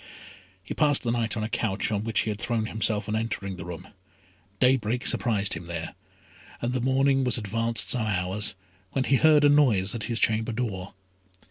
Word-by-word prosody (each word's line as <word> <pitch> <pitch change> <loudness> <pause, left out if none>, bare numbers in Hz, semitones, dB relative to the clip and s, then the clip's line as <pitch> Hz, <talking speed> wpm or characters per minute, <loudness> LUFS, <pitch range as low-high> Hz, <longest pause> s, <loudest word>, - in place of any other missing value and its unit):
He - - -6
passed 145 -2 +2
the 120 - 0
night 115 -2 -1
on 110 - -2
a - - -1
couch 110 -2 -1
on 105 -1 -1
which 110 -2 0
he 110 - -2
had 105 - -6
thrown 115 -2 -1
himself 110 -1 -1
on 105 - -2
entering 105 -4 -3
the 90 -2 -8
room. 90 -2 -8 0.7
Daybreak 125 -2 +2
surprised 105 -4 +1
him 85 +1 -7
there: 85 -2 -5 0.7
and 120 +1 -2
the 130 - -1
morning 135 +1 +2
was 125 -2 +2
advanced 115 -2 0
some 115 -3 0
hours, 95 +1 -1 0.4
when 135 - +1
he 135 +1 +3
heard 155 0 +5
a - - +7
noise 115 -10 +3
at 115 - -3
his 115 -2 -2
chamber 110 +1 +1
door. 100 -6 -4
110 Hz, 195 wpm, -26 LUFS, 100-125 Hz, 0.7 s, a